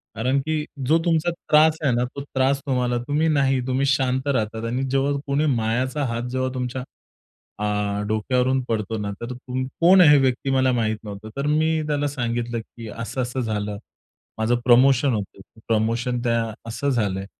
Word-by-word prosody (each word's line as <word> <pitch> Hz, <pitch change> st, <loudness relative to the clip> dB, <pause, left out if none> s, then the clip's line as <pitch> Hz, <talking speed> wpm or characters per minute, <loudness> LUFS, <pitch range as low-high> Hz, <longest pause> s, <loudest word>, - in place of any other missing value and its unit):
कारण 130 Hz, +5 st, +1 dB
की 155 Hz, +1 st, -1 dB, 0.2 s
जो 160 Hz, -, +5 dB
तुमचा 170 Hz, 0 st, +2 dB
त्रास 155 Hz, -1 st, +3 dB
आहे 140 Hz, -, +3 dB
ना, 120 Hz, -, +1 dB
तो 140 Hz, +3 st, -7 dB
त्रास 135 Hz, 0 st, 0 dB
तुम्हाला 125 Hz, -2 st, 0 dB
तुम्ही 150 Hz, +2 st, +1 dB
नाही 135 Hz, -3 st, +2 dB
तुम्ही 130 Hz, +1 st, +1 dB
शांत 130 Hz, 0 st, +1 dB
राहतात 115 Hz, -4 st, -1 dB
आणि 125 Hz, +3 st, -1 dB
जेव्हा 135 Hz, +1 st, +1 dB, 0.2 s
कोणी 140 Hz, +2 st, +1 dB
मायाचा 125 Hz, +6 st, -1 dB
हात 120 Hz, +1 st, -3 dB
जेव्हा 130 Hz, 0 st, -1 dB
तुमच्या 125 Hz, 0 st, -3 dB, 0.7 s
अ, 105 Hz, -, -2 dB, 0.4 s
डोक्यावरून 125 Hz, +4 st, +1 dB
पडतो 110 Hz, -1 st, -1 dB
ना, 105 Hz, -1 st, -3 dB
तर 120 Hz, +2 st, -4 dB
तुम 125 Hz, +1 st, -4 dB, 0.2 s
कोण 185 Hz, +2 st, +7 dB
आहे 165 Hz, -, +8 dB
हे 145 Hz, -, +7 dB
व्यक्ती 130 Hz, 0 st, 0 dB
मला 130 Hz, -1 st, +3 dB
माहीत 110 Hz, -3 st, 0 dB
नव्हतं. 105 Hz, 0 st, -8 dB
तर 140 Hz, +1 st, -2 dB
मी 155 Hz, +1 st, +2 dB
त्याला 145 Hz, -1 st, 0 dB
सांगितलं, 120 Hz, -3 st, -2 dB
की 115 Hz, 0 st, -11 dB
असं 115 Hz, +4 st, -4 dB
असं 125 Hz, +1 st, -3 dB
झालं. 105 Hz, -3 st, -3 dB, 0.6 s
माझं 110 Hz, +2 st, +1 dB
प्रमोशन 130 Hz, +2 st, +5 dB
होतं. 100 Hz, -2 st, -4 dB, 0.3 s
प्रमोशन 115 Hz, +2 st, 0 dB
त्या 115 Hz, -2 st, 0 dB, 0.2 s
असं 125 Hz, +5 st, -2 dB
झालंय. 100 Hz, -7 st, -1 dB
125 Hz, 170 wpm, -23 LUFS, 115-140 Hz, 0.7 s, आहे